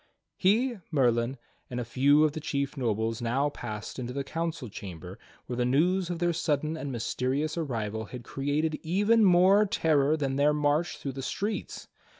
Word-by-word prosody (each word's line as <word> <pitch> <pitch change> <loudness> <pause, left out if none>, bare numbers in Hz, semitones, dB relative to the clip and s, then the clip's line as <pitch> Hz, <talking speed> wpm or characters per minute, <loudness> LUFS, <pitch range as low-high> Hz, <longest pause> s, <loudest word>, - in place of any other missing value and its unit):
He, 230 +4 +2
Merlin, 125 -3 +1 0.3
and 125 - -4
a 120 - -3
few 140 +5 +4
of 155 - +3
the 155 - -5
chief 140 -2 -2
nobles 115 -2 -1
now 130 +5 +1
passed 110 -4 -7
into 125 0 -4
the 140 +1 -2
council 165 -2 -3
chamber 95 -5 -9 0.3
where 125 - -5
the 125 - +1
news 170 +8 +2
of 175 - -2
their 175 0 +1
sudden 155 -1 -1
and 145 -3 -5
mysterious 130 +5 -1
arrival 110 -9 -3
had 125 +3 -9
created 145 +5 -1
even 205 +7 +3
more 190 +2 +6
terror 155 -5 +2
than 135 -3 -1
their 145 +1 +4
march 150 +3 +1
through 140 - -4
the 135 +1 -6
streets. 205 +10 -4
145 Hz, 170 wpm, -28 LUFS, 125-165 Hz, 0.3 s, more